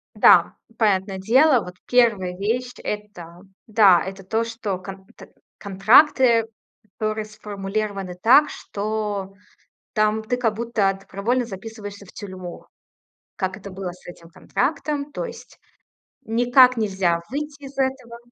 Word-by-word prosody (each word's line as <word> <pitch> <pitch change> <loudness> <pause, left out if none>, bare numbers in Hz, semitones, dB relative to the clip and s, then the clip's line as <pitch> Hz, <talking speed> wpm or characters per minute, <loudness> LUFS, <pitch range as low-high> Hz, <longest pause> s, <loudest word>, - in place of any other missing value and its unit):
Да, - - +5 0.2
понятное 195 -3 +1
дело. 250 +5 +4
Вот 180 0 -10
1 210 -8 +2
вещь- 245 +5 -2
это, 180 -5 -7 0.3
да, 205 -5 +5
это 195 0 -8
то, 220 +4 -1
что 225 -4 -4
конт 190 +1 -10 0.5
контракты, 230 +4 +4 0.5
которые 215 0 -2
сформулированы 205 -2 -5
так, 270 +6 +6
что 205 -2 -4 0.6
там 215 +1 +1
ты, 245 +3 -2
как 225 -4 0
будто, 220 -4 0
добровольно 230 +6 -2
записываешься 205 -1 -9
в - - -15
тюрьму, 185 -3 -9 0.7
как 190 0 -3
это 200 -1 -10
было 185 -1 -6
с 180 - -18
этим 170 -1 -12
контрактом. 290 - -2
То - - -4
есть, 480 - -11 0.7
никак 245 +2 +4
нельзя 190 -6 0
выйти 290 +2 -5
из 275 0 -9
этого. 260 -3 -2
215 Hz, 125 wpm, -22 LUFS, 195-240 Hz, 0.7 s, так